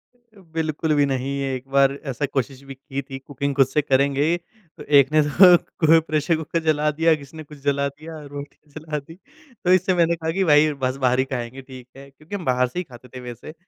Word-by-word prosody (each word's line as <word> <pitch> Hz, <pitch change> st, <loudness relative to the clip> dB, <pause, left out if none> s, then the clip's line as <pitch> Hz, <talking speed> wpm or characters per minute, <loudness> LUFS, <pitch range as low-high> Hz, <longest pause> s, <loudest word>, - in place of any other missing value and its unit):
अ, 235 Hz, -4 st, -24 dB
बिल्कुल 155 Hz, -1 st, -1 dB
भी 145 Hz, -, +3 dB
नहीं। 135 Hz, -1 st, -2 dB
ये 135 Hz, -1 st, -2 dB
एक 130 Hz, +1 st, -9 dB
बार 140 Hz, 0 st, +4 dB, 0.2 s
ऐसा 140 Hz, +3 st, -2 dB
कोशिश 135 Hz, -1 st, -3 dB
भी 135 Hz, -, -7 dB
की 135 Hz, +1 st, -6 dB
थी, 135 Hz, 0 st, -9 dB
कुकिंग 140 Hz, +1 st, -4 dB
ख़ुद 135 Hz, -2 st, +5 dB
से 150 Hz, +3 st, 0 dB
करेंगे। 140 Hz, +2 st, +1 dB, 0.5 s
तो -, -, -9 dB, 0.2 s
एक 140 Hz, 0 st, +2 dB
ने 155 Hz, 0 st, +4 dB
तो 175 Hz, +5 st, +7 dB, 0.3 s
को 165 Hz, +1 st, +7 dB
प्रेशर 155 Hz, +2 st, +1 dB
कुकर 160 Hz, +1 st, -2 dB
जला 150 Hz, 0 st, +2 dB
दिया, 165 Hz, 0 st, +5 dB
किसी 145 Hz, +2 st, -13 dB
ने 155 Hz, -, -7 dB
कुछ 150 Hz, 0 st, -14 dB
जला 140 Hz, 0 st, +1 dB
दिया 155 Hz, +3 st, -10 dB
रोटी 145 Hz, 0 st, -9 dB, 0.2 s
जला 155 Hz, -1 st, -4 dB
दी 160 Hz, +4 st, -14 dB, 0.5 s
तो 180 Hz, -, +4 dB
इससे 185 Hz, 0 st, +3 dB
मैंने 170 Hz, -1 st, +2 dB
कहा 160 Hz, 0 st, -3 dB
कि 190 Hz, -, +2 dB
भाई 150 Hz, +1 st, +5 dB
बस 130 Hz, +1 st, -1 dB
बाहर 125 Hz, +1 st, +2 dB
ही 130 Hz, -, +2 dB
ख़ाएँगे 125 Hz, +1 st, -5 dB
ठीक 130 Hz, -1 st, -12 dB
है। 140 Hz, 0 st, -12 dB
क्योंकि 155 Hz, +8 st, -10 dB
हम 185 Hz, -4 st, -6 dB
बाहर 125 Hz, 0 st, +2 dB
से 175 Hz, -, -5 dB
ही -, -, -2 dB
ख़ाते 125 Hz, -5 st, -15 dB
थे। -, -, -6 dB
वैसे 120 Hz, +5 st, -9 dB
145 Hz, 235 wpm, -22 LUFS, 135-160 Hz, 0.5 s, तो